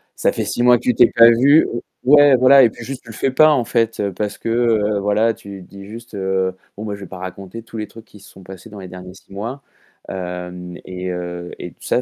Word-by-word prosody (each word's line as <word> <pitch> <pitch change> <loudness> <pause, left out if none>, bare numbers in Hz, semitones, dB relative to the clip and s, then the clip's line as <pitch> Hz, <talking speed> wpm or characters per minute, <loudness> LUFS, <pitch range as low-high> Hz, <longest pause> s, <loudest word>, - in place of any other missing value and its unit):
Ça - - +1
fait - - -3
6 - - -3
mois 125 0 +5
que 120 - -13
tu 125 - +2
t'es 120 - +5
pas 115 0 +8
vu, 140 +7 +5
heu 120 - -5 0.2
ouais 145 0 +6
voilà 130 +2 +6
et 115 - +5
puis 120 - -11
juste, 135 +1 -7
tu 115 - -16
le - - -12
fais 135 - 0
pas 155 +3 +5
en 130 -5 +2
fait 115 -2 -1 0.2
parce 105 -1 -3
que, 115 - -4
heu, 110 -3 +1
voilà, 105 +3 +1
tu 100 -1 -11
dis 100 +2 -13
juste, 115 +2 -11
heu: 95 -1 -1 0.2
«Bon 105 - -6
moi 105 -2 -4
je 100 - -13
vais 95 - -8
pas 95 - -10
raconter 95 +4 -8
tous 115 0 -10
les 105 - -4
trucs 115 -1 -14
qui 105 - -17
se - - -16
sont 95 - -16
passés 95 +3 -12
dans 105 -1 -11
les 95 - -9
derniers 90 0 -11
6 95 - -18
mois», 115 +8 -6 0.5
hem 90 -1 -7
et 90 0 -6
heu 90 0 -6
et 90 - -6
tout - - -21
ça, 125 - 0
105 Hz, 265 wpm, -19 LUFS, 95-120 Hz, 0.5 s, pas